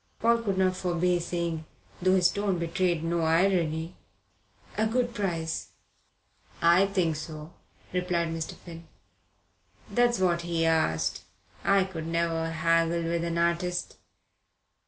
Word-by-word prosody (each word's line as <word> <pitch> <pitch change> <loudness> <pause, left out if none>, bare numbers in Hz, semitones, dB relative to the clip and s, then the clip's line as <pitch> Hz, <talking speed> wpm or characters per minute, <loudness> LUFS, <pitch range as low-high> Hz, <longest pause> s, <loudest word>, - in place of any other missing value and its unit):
Paul 235 +1 +3
could 200 -4 -1
not 185 -1 +2
forbear 180 0 +1
saying, 170 -2 -3 0.4
though 185 +1 +4
his 180 -1 +4
tone 200 -2 -1
betrayed 170 0 0
no 170 0 0
irony: 165 -1 +1 0.8
"A 220 +2 +1
good 240 +1 0
price." 170 -7 -3 0.9
"I 170 +3 +5
think 180 -5 0
so," 155 +1 -8 0.4
replied 180 -2 0
Mr. 165 -1 -4
Finn. 165 -1 -12 1.0
"That's 240 -1 +3
what 175 -2 +1
he 170 -1 -1
asked. 80 - +1 0.4
I 195 -1 +4
could 165 -4 -6
never 165 -1 0
haggle 165 +1 +1
with 170 0 -1
an 170 0 -2
artist. 170 +1 -1
170 Hz, 125 wpm, -28 LUFS, 165-185 Hz, 1.0 s, I